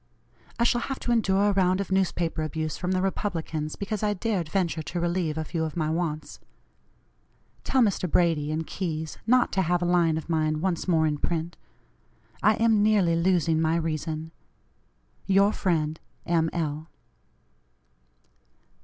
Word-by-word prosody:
I 235 - +1
shall 240 0 +2
have 270 +2 -4
to 240 - -1
endure 205 -3 +3
a - - +3
round 185 -1 +2
of 200 -1 -4
newspaper 175 -4 0
abuse 155 0 -3
from 180 0 -2
the 185 0 0
Republicans 165 -6 -2
because 200 +1 -4
I 210 -1 +1
dared 185 -5 -2
venture 170 -3 0
to 175 +3 -4
relieve 170 -2 -1
a 160 - -1
few 160 +1 -2
of 160 +1 -4
my 155 -1 0
wants. 160 -2 -3 1.2
Tell 260 -2 +3
Mr. 195 -4 0
Brady 155 -3 +2
and 160 +1 -2
Keyes 160 -4 -4
not 250 +1 +4
to 190 - +1
have 175 0 +1
a - - +1
line 170 -2 +3
of 160 - -6
mine 155 -2 0
once 180 +1 -1
more 160 -3 +3
in 150 -2 -1
print. 170 +1 -2 0.9
I 215 +1 +4
am 225 -2 +3
nearly 205 -6 +3
losing 165 -2 +2
my 160 0 +2
reason. 160 -1 -3 1.0
"Your 200 +1 +4
friend, 160 -4 0 0.3
"M. 165 -1 +2
L." 155 -1 -3
170 Hz, 160 wpm, -26 LUFS, 160-195 Hz, 1.2 s, not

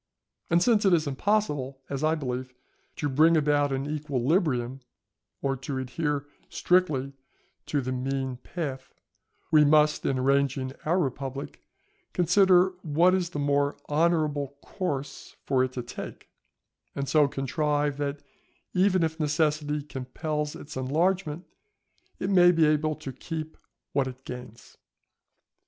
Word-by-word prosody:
And 170 +1 +4
since 220 0 +3
it 195 -3 +4
is 160 -2 +3
impossible, 145 -4 0
as 140 +1 -4
I 155 +1 +3
believe, 130 -3 -4 0.4
to 145 - -2
bring 155 +4 +4
about 145 -1 +2
an 135 +1 -2
equilibrium, 140 - 0 0.6
or 135 -1 +1
to 135 +1 -5
adhere 145 +2 -2 0.2
strictly 150 -7 +1 0.5
to 145 - 0
the 130 0 -3
mean 130 0 -2
path, 135 -2 -6 0.6
we 155 -1 +7
must, 150 +1 +4
in 135 - 0
arranging 135 0 +1
our 170 +4 +2
republic, 135 -3 -3 0.5
consider 180 +1 +5
what 170 +3 +3
is 180 -2 0
the 170 - -6
more 145 0 +1
honourable 150 -3 +1
course 145 -8 -4
for 130 -1 +2
it 130 - -1
to 125 - -4
take, 120 - -8 0.7
and 140 0 -2
so 150 -1 +4
contrive 145 +1 -1
that 145 0 -3 0.5
even 185 -1 +3
if 160 0 -2
necessity 150 -1 0
compel 150 +3 -3
its 150 - -10
enlargement, 160 +5 0 0.7
it 190 - -2
may 175 -2 +7
be 165 -2 +4
able 155 0 +2
to 135 - -7
keep 160 +2 -6 0.4
what 140 -2 +1
it 130 0 -9
gains. 125 -2 -10
145 Hz, 135 wpm, -27 LUFS, 135-160 Hz, 0.7 s, we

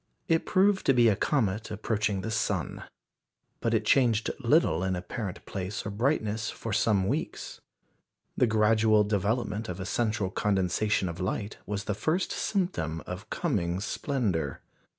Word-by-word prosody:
It 165 0 +1
proved 195 +1 +3
to 135 - +5
be 120 -2 +6
a 105 - +3
comet 110 -5 0
approaching 105 -2 -1
the 110 - -4
sun. 110 - -2 0.7
But 115 0 +1
it 110 -1 0
changed 115 -3 +3
little 80 +3 +3
in 95 0 0
apparent 90 +2 -5
place 95 +1 -4
or 100 - -3
brightness 110 -1 0
for 115 - -5
some 100 -3 +2
weeks. 145 +9 -3 0.7
The 125 - +3
gradual 110 0 +4
development 105 +1 -1
of 90 +1 -5
a 95 - -4
central 105 -2 0
condensation 100 0 +1
of 85 0 -5
light 100 +3 -3
was 100 -1 -2
the 105 - -1
first 160 - 0
symptom 80 - -1
of - - -7
coming 85 +1 -1
splendour. 100 - -2
105 Hz, 150 wpm, -28 LUFS, 95-115 Hz, 0.7 s, be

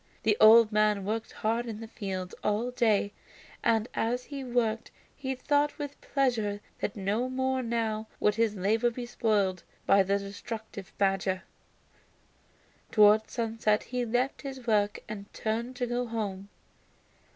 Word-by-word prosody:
The 215 -1 +3
old 220 0 +8
man 210 -2 +2
worked 220 +2 -2
hard 230 +2 -1
in 220 -2 -5
his 225 0 -9
fields 190 -4 -5
all 215 +4 0
day, 215 -4 +2 0.5
and 225 0 +2
as 245 +2 -1
he 275 0 -6
worked 235 -3 0 0.3
he 265 -2 -3
thought 290 +2 +1
with 290 -2 -6
pleasure 230 -7 0 0.2
that 200 - -2
no 210 +5 -1
more 260 0 0
now 225 -2 -1
would 210 - +3
his 225 -1 +1
labor 220 +5 +2
be 240 +1 -6
spoiled 205 -6 0 0.2
by 195 0 +6
the 195 +1 +2
destructive 200 0 -7
badger. 195 -1 +1 1.5
Towards 215 0 +5
sunset 225 -2 0
he 250 0 -2
left 245 +3 0
his 270 -3 -7
work 210 -2 +1
and 205 -1 -8
turned 230 +3 -2
to 245 - -1
go 245 0 -2
home. 200 -4 -4
220 Hz, 145 wpm, -29 LUFS, 205-245 Hz, 1.5 s, old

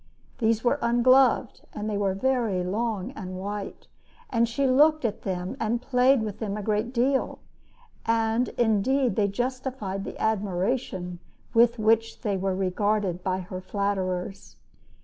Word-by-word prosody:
These 225 -1 +1
were 265 +4 +2
ungloved, 245 +1 +3
and 210 0 -4
were 195 -2 0
very 230 -5 0
long 210 +3 -2
and 185 -8 -7
white, 200 +1 -6 0.5
and 235 -1 +2
she 275 +4 0
looked 295 +2 +4
at 215 -2 -2
them 185 -1 -3
and 230 +2 0
played 255 0 +3
with 210 -1 -5
them 210 -2 -3
a 210 - -5
great 215 +3 0
deal; 260 +2 +1 0.7
and, 225 +1 +2
indeed, 240 +1 +2
they 205 -1 +2
justified 245 -3 -3
the - - -7
admiration 195 -3 -1 0.3
with 235 +1 +4
which 225 +1 +1
they 210 -4 -1
were 190 0 -1
regarded 195 0 0
by 185 0 -1
her 185 +1 -7
flatterers. 195 -1 -3
215 Hz, 140 wpm, -26 LUFS, 195-240 Hz, 0.7 s, looked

